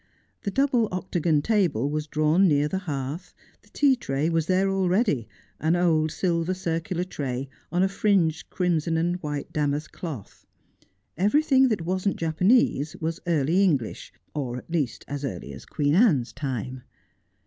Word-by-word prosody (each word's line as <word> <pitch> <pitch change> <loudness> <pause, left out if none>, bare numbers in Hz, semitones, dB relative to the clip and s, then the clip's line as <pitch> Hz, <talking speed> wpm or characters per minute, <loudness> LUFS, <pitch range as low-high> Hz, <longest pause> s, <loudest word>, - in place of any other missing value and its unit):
The - - -2
double 250 -1 +2
octagon 175 -4 0
table 175 - +1
was 150 +1 -2
drawn 155 +6 +3
near 145 -2 +3
the 190 +5 -2
hearth, 145 +5 -4 0.3
the - - -25
tea 280 -2 +3
tray 150 - -1
was 165 -1 0
there 185 +1 +2
already, 190 - +1 0.3
an 160 +2 +2
old 160 -3 +2
silver 170 +1 0
circular 170 0 -2
tray, 135 -7 -4 0.2
on 180 +2 +2
a - - +4
fringed 190 -5 +1
crimson 165 -3 0
and 175 +2 0
white 150 -4 -5
damask 150 0 -1
cloth. 150 - -8 0.7
Everything 265 - +4
that 205 -9 -1
wasn't 185 +2 0
Japanese 165 - +2
was 165 +2 -3
early 165 +3 +2
English, 140 - 0 0.2
or 130 -5 -3
at 125 - -11
least 145 -9 -1
as 145 0 -5
early 90 - -5
as 65 - -11
Queen 145 0 0
Anne's 165 - +3
time. 130 -2 -4
165 Hz, 150 wpm, -25 LUFS, 145-185 Hz, 0.7 s, a